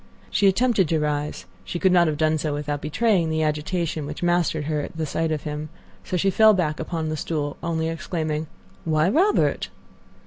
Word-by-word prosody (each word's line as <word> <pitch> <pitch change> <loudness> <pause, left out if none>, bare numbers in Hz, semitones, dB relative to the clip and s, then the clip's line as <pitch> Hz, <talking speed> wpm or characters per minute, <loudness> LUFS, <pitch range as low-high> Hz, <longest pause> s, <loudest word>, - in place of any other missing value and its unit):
She 200 - +3
attempted 200 -3 +3
to 160 - +2
rise; 150 0 -2 0.2
she 175 - -4
could 185 +2 +3
not 175 -2 +5
have 155 -1 -1
done 155 0 +2
so 150 -1 -1
without 145 0 -3
betraying 185 +1 +1
the 160 0 0
agitation 155 0 -1
which 150 +3 -6
mastered 175 -3 +1
her 150 0 -1
at 160 +2 -4
sight 160 +3 -1
of 150 -2 -2
him, 150 0 -5 0.3
so 180 - -2
she 195 +3 +2
fell 220 +1 +6
back 155 -4 -1
upon 160 -1 -3
the 155 - -2
stool, 145 -1 -2
only 160 -1 -1
exclaiming, 160 -2 -3 0.4
"Why, 155 +1 +2
Robert!" 375 - +2
160 Hz, 185 wpm, -24 LUFS, 150-175 Hz, 0.4 s, fell